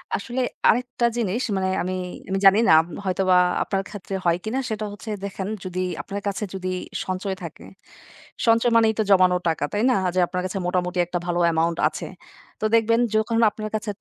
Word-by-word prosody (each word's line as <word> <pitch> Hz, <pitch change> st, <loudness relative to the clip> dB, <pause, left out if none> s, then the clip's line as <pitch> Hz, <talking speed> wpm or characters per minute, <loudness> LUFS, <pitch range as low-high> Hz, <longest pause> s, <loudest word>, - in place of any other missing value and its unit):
আসলে 245 Hz, +5 st, -3 dB, 0.3 s
আরেকটা 245 Hz, 0 st, +1 dB
জিনিস 230 Hz, +2 st, -1 dB
মানে 190 Hz, 0 st, 0 dB
আমি 185 Hz, +1 st, -3 dB, 0.4 s
আমি 195 Hz, 0 st, 0 dB
জানি 195 Hz, +3 st, +7 dB
না, -, -, +6 dB
আম 165 Hz, -, -11 dB, 0.2 s
হয়তোবা 185 Hz, 0 st, +2 dB, 0.3 s
আপনার 195 Hz, -2 st, -1 dB
ক্ষেত্রে 195 Hz, -1 st, -6 dB
হয় 170 Hz, 0 st, +3 dB
কিনা? 235 Hz, +5 st, -2 dB
সেটা 215 Hz, -1 st, -3 dB
হচ্ছে, 205 Hz, +2 st, -9 dB
দেখেন, 195 Hz, -1 st, -4 dB, 0.2 s
যদি 185 Hz, 0 st, -3 dB, 0.2 s
আপনার 200 Hz, +1 st, -6 dB
কাছে 200 Hz, +1 st, -2 dB
যদি 185 Hz, -1 st, -3 dB, 0.3 s
সঞ্চয় 190 Hz, +1 st, -3 dB
থাকে। 165 Hz, -, -9 dB, 0.8 s
সঞ্চয় 230 Hz, +1 st, +4 dB
মানেই 225 Hz, -1 st, +5 dB
তো -, -, +4 dB
জমানো 185 Hz, -1 st, +5 dB
টাকা, 160 Hz, -, -2 dB
তাই 210 Hz, +2 st, 0 dB
না? -, -, +3 dB
আ -, -, +2 dB
যে -, -, +2 dB
আপনার 180 Hz, -, -3 dB
কাছে 185 Hz, +1 st, -3 dB
মোটামুটি 180 Hz, 0 st, -1 dB
একটা 175 Hz, +1 st, -3 dB
ভালো 175 Hz, 0 st, -1 dB
অ্যামাউন্ট 165 Hz, 0 st, +1 dB
আছে। -, -, -5 dB, 0.5 s
তো 215 Hz, -, -2 dB
দেখবেন, 230 Hz, +1 st, +3 dB, 0.2 s
যখন 220 Hz, +1 st, +1 dB
আপনার 215 Hz, +1 st, -6 dB
কাছে 215 Hz, 0 st, -3 dB
195 Hz, 190 wpm, -23 LUFS, 185-220 Hz, 0.8 s, জানি